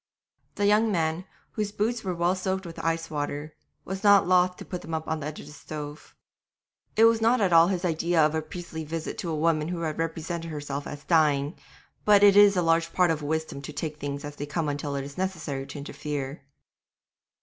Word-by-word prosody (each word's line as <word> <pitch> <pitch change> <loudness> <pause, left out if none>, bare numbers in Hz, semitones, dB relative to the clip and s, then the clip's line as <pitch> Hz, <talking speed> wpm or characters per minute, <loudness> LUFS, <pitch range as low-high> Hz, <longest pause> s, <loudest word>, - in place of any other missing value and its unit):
The 205 - 0
young 210 +2 +4
man, 165 -1 0 0.3
whose 210 -2 -2
boots 225 +3 -1
were 185 -3 -2
well 170 +1 +2
soaked 190 0 -2
with 165 -1 -8
ice 165 0 -1
water, 145 0 -3 0.3
was 190 +2 -5
not 200 -3 +6
loth 180 0 +3
to - - -9
put 180 -2 -5
them 160 0 -4
up 160 0 -4
on 160 0 -1
the 145 - -4
edge 155 - -6
of - - -9
the 150 - -11
stove. 150 0 -8 0.8
It 220 - +5
was 230 0 +4
not 235 +3 +4
at 190 -4 +2
all 165 0 +7
his 185 -1 -1
idea 170 0 +1
of 155 - +1
a 160 - 0
priestly 160 0 -7
visit 160 +1 -5
to 175 - -3
a 160 - -1
woman 155 0 +1
who 175 -1 -3
had 155 -2 -3
represented 165 +1 -3
herself 145 -2 -5
as 145 0 -8
dying, 150 -2 +2 0.5
but 205 -1 +6
it 200 -1 +7
is 205 -1 +7
a 180 - +2
large 165 0 +2
part 180 -2 +3
of 155 -2 -2
wisdom 160 -1 -3
to 140 - -7
take 150 0 -4
things 140 0 -4
as 145 0 -8
they 145 - -5
come 155 +1 -1
until 145 0 -3
it 140 - -2
is 140 +4 -9
necessary 160 -8 -3
to - - -8
interfere. 140 -1 -5
165 Hz, 220 wpm, -27 LUFS, 150-185 Hz, 0.8 s, all